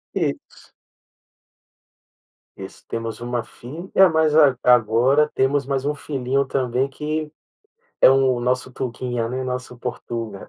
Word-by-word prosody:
Isso. - - -4 1.8
Isso. - - -10
Temos 115 0 -5
1 120 0 -3
fi 120 - -15 0.3
é, 190 - +8
mas 160 -2 +2
ag 145 -5 +5
agora 125 +5 +4
temos 135 +1 +1
mais 135 0 -2
1 150 +1 0
filhinho 140 -1 -1
também, 130 0 -1
que 150 +2 -4 0.7
é - - +8
o 135 -2 +3
nosso 125 +1 -1
tuguinha, 120 -1 -3
né, 130 +2 -3
nosso 125 -1 -5
portuga. 115 -4 -6
130 Hz, 125 wpm, -22 LUFS, 120-140 Hz, 1.8 s, é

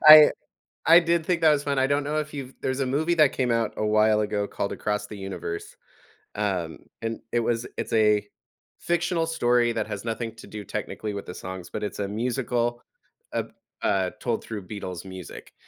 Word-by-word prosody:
I 155 0 +12 0.6
I 165 +3 +9
did 170 -1 +1
think 175 -2 +1
that 160 -1 +6
was 145 -1 +2
fun. 140 -1 0
I 130 - +4
don't 145 +1 +1
know 150 +2 -1
if 150 0 -3
you've 135 -2 -6
there's 130 +1 -1
a 135 - +1
movie 155 +6 +1
that 155 -4 +5
came 125 -2 0
out 115 -2 +1
a - - -1
while 110 0 +4
ago 105 -1 0
called 100 - -3
Across 105 0 -2
the 105 - -8
Universe. 95 -3 -5 0.6
Um, 95 -6 -1 0.2
and 115 0 -3
it 120 - +2
was 115 +1 0
it's - - -3
a 105 -2 +4 0.5
fictional 170 -1 +1
story 120 -6 +3
that 115 - -1
has 100 +2 -5
nothing 115 0 -3
to 115 - -12
do 105 -1 -7
technically 105 +2 -4
with 100 - -5
the 90 - -7
songs, 95 -1 -7
but 105 - -4
it's 105 - -4
a 100 - -1
musical, 120 +2 -1 0.5
ab - - -2 0.3
uh, 95 -2 +2
told 120 -2 -1
through 105 -4 -6
Beatles 95 -4 -6
music. 95 -4 -9
115 Hz, 200 wpm, -26 LUFS, 105-140 Hz, 0.6 s, I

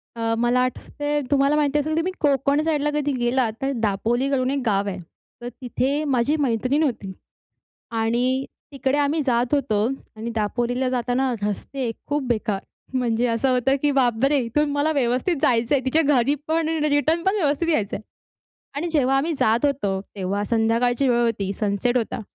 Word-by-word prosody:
अ, 225 -1 -1
मला 240 +1 +2
आठवतंय, 290 +3 -2
तुम्हाला 280 +1 +3
माहिती 295 -1 +2
असेल 310 +2 -1
की - - -1
तुम्ही 365 +3 -1
कोकण 280 0 +2
साईडला 300 -2 +1
कधी 290 -1 0
गेलात, 240 -1 +1
तर 270 +1 0
दापोली 230 +6 0
करून 260 -2 +1
एक 280 - 0
गाव 200 -2 +1
आहे. 195 - -3 0.4
तर 240 - -5
तिथे 265 +4 -1
माझी 265 +2 +2
मैत्रीण 260 +3 +1
होती 230 -9 -2 0.9
आणि 250 +4 +1 0.3
तिकडे 275 0 0
आम्ही 290 +2 +1
जात 240 -1 +1
होतो. 215 -7 +1 0.3
आणि 220 +2 -5
दापोलीला 240 +4 -1
जाताना 250 +1 0
रस्ते 235 +4 -3 0.2
खूप 290 -1 -1
बेकार, 215 -4 -1 0.3
म्हणजे 245 -1 +1
असं 230 +3 +1
होतं 255 +2 +2
की 295 - +2
बापरे! 270 +1 +2
इथून 295 +6 0
मला 290 +2 +1
व्यवस्थित 260 +4 +1
जायचं 240 +2 +2
आहे 265 - 0
तिच्या 305 +5 +3
घरीपण 295 +5 0
आणि 310 -2 0
रिटर्नपण 330 +7 +2
व्यवस्थित 325 -3 0
यायचं 215 -11 0
आहे. - - -6 0.7
आणि 320 +5 -2
जेव्हा 270 -4 +2
आम्ही 305 +5 0
जात 225 +5 +2
होतो, 205 -9 -1 0.2
तेव्हा 195 +1 -2
संध्याकाळची 235 +4 +1
वेळ 240 -1 +3
होती, 205 -4 -1
सनसेट 210 +4 0
होता. 230 - -3
260 Hz, 165 wpm, -23 LUFS, 230-290 Hz, 0.9 s, तुम्हाला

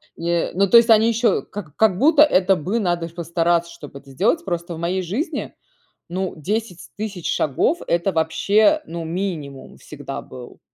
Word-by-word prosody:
Э, 170 0 -1
ну 195 +2 +1
то 235 - +8
есть 230 0 +5
они 220 0 +5
еще, 230 +1 +1
как 175 -8 -10
как 215 -5 +3
будто 300 - +4
это 195 -10 +4
бы 190 +8 -2
надо 175 -4 -1
ж 165 - -23
постараться, 170 0 0
чтоб 150 -5 -12
это 140 0 -12
сделать. 235 - 0
Просто 170 0 -4
в - - -9
моей 175 +3 -1
жизни, 210 - -4 0.5
ну 185 +1 -3
10000 205 +3 -4
тысяч 205 -5 -4
шагов- 155 - 0
это 170 +3 +1
вообще, 200 - +2
ну 170 0 -6
минимум 160 -6 -5
всегда 145 -2 -8
был. 125 -1 -12
180 Hz, 175 wpm, -21 LUFS, 165-215 Hz, 0.5 s, то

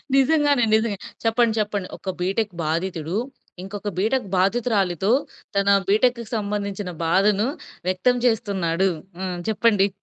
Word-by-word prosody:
నిజంగానే 285 -2 +4
నిజంగా. 220 -3 0 0.3
చెప్పండి, 225 0 +3
చెప్పండి. 205 -3 -1
ఒక 190 - -6
బీటెక్ 195 +2 0
బాధితుడు, 165 +2 -2 0.5
ఇంకొక 205 +1 -5
బీటెక్ 220 +3 +1
బాధితురాలితో 195 -2 +1 0.4
తన 200 0 +1 0.2
బీటెక్‌కి 235 +3 +3
సంబంధించిన 200 -2 -3 0.2
బాధను, 200 +5 +3 0.4
వ్యక్తం 185 +7 +2
చేస్తున్నాడు. 195 -5 +1 0.3
హ్మ్. 185 -2 -3
చెప్పండి. 210 -2 +3
205 Hz, 110 wpm, -23 LUFS, 190-225 Hz, 0.5 s, నిజంగానే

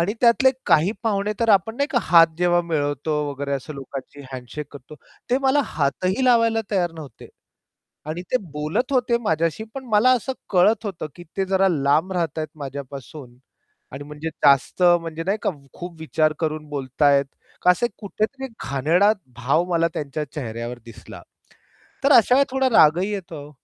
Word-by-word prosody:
आणि 175 +5 +1
त्यातले 245 +2 +5 0.2
काही 165 +7 +4
पाहुणे 210 -2 0
तर 230 - +1
आपण 210 +3 +2
नाही 280 - +1
का 245 - +2
हात 165 0 +6
जेव्हा 175 0 +3
मिळवतो 145 -2 -2 0.2
वगैरे 140 0 -4
असं 140 +3 -4
लोकांशी 135 +1 -8
हँडशेक 130 +4 -7
करतो, 145 +1 -12 0.4
ते 255 - +3
मला 270 +1 +2
हातही 185 - -1
लावायला 230 -2 +3
तयार 180 -5 0
नव्हते 155 -4 -11 0.8
आणि 170 +3 -4
ते - - +5 0.2
बोलत 155 - -2
होते 245 -2 +2
माझ्याशी, 165 +1 0
पण 270 -1 -6
मला 220 +3 +4
असं 255 +1 -1 0.2
कळत 205 +4 +3
होतं, 185 -6 -5
की 175 - -11
ते 195 - +1
जरा 190 0 +2
लांब 155 +2 +1
राहतात 170 -4 -2
आहे 155 0 -6
माझ्यापासून 140 -1 -8 0.6
आणि 135 +2 -7
म्हणजे 150 +2 -6 0.2
जास्त 140 +5 +3 0.2
म्हणजे 165 -1 -6
नाही 200 +3 0
का - - +1
कम 140 -6 -14
खूप 175 -1 -9
विचार 155 -1 +1
करून 155 -1 -3
बोलत 135 -1 -5
आहेत 140 -1 +5 0.4
का 180 - +6
असे 210 +7 +2
कुठेतरी 220 +6 -3 0.2
घाणेरडा 165 +10 +3 0.2
भाव 135 +8 +1
मला 165 0 +2
त्यांच्या 150 +1 -4
चेहऱ्यावर 120 -3 -5
दिसला. 115 - -12 0.8
तर 285 - +5
अशा 235 0 +6
वेळेस 275 +1 +4
थोडा 265 0 +1
रागही 180 -1 +4
येतो 180 -5 -6
हो. 145 - -13
165 Hz, 170 wpm, -22 LUFS, 145-210 Hz, 0.8 s, हात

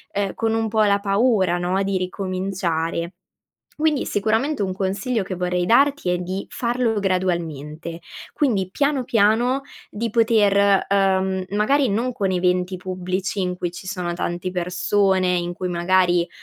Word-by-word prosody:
uhm, 200 -1 0
con 225 -1 0
un 225 0 0
po' 220 0 +1
la 200 -1 +3
paura 200 -3 +2
no, 185 +2 0
di 195 0 -1
ricominciare. 185 -2 -2 0.7
Quindi, 305 -3 +2
sicuramente 220 +7 0
un 185 -1 -2
consiglio 200 +4 -1
che 185 - -5
vorrei 180 0 -1
darti 275 -3 +3
è 180 - +1
di 185 +2 -4
farlo 235 -2 0
gradualmente, 170 -4 -2 0.3
quindi, 215 - +1
piano, 280 +1 0
piano 235 +4 +2 0.3
di 230 +2 -3
poter, 205 -4 +3
uhm, 190 -1 +1
magari 250 +7 +2
non 235 +5 0
con 195 -4 -1
eventi 180 0 0
pubblici 185 +2 -3
in 180 -1 -1
cui 175 -1 -3
ci 185 - -10
sono 180 -2 -3
tante 175 +1 -3
persone, 185 +1 +1
in 175 0 -3
cui 185 0 -4
magari, 175 0 +2
190 Hz, 145 wpm, -22 LUFS, 180-220 Hz, 0.7 s, la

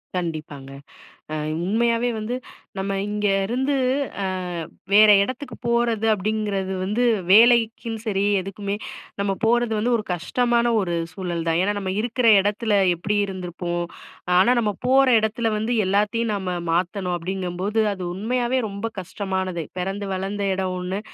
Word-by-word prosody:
கண்டிப்பாங்க. 155 -6 -4 0.6
அ - - -1 0.3
உண்மையாவே 235 +4 +1
வந்து 215 +3 -3 0.4
நம்ம 195 +1 -2
இங்கருந்து, 210 +6 0 0.5
அ - - 0 0.7
வேற 215 +1 +8
எடத்துக்கு 255 +5 -5
போறது 235 -2 +1
அப்டிங்கறது 205 -2 -2
வந்து 210 +6 0 0.3
வேலைக்கும் 230 +1 +4
சரி, 200 -2 0 0.2
எதுக்குமே 200 +1 -4 0.4
நம்ம 200 0 +1
போறது 240 0 +2
வந்து 235 +4 +1
ஒரு 215 - -4
கஷ்டமான 235 +7 +1
ஒரு 175 -3 -2 0.2
சூழல் 175 -4 -4
தான். 165 0 +2
ஏனா 205 +2 +1
நம்ம 190 -2 -3
இருக்குற 240 +2 0
இடத்துல 210 +2 0 0.2
எப்டி 190 +5 -2
இருந்திருப்போம்? 175 -2 -4 0.5
ஆனா 190 +6 +5
நம்ம 210 -3 0
போற 270 +1 +5
இடத்துல 220 +1 0
வந்து 220 +3 -1
எல்லாத்தையும் 210 +3 +1
நம்ம 190 -2 -3 0.2
மாத்தணும் 180 +1 -1
அப்டிங்கம்போது, 185 +3 -3
அது 190 -2 -6
உண்மையாவே 240 +5 0
ரொம்ப 200 +2 -4
கஷ்டமானது. 190 -2 -3
பெறந்து 195 +3 -3
வளந்த 195 +2 -3
இடம் 185 -1 -2
ஒண்ணு, 185 +2 -3
205 Hz, 130 wpm, -23 LUFS, 185-230 Hz, 0.7 s, வேற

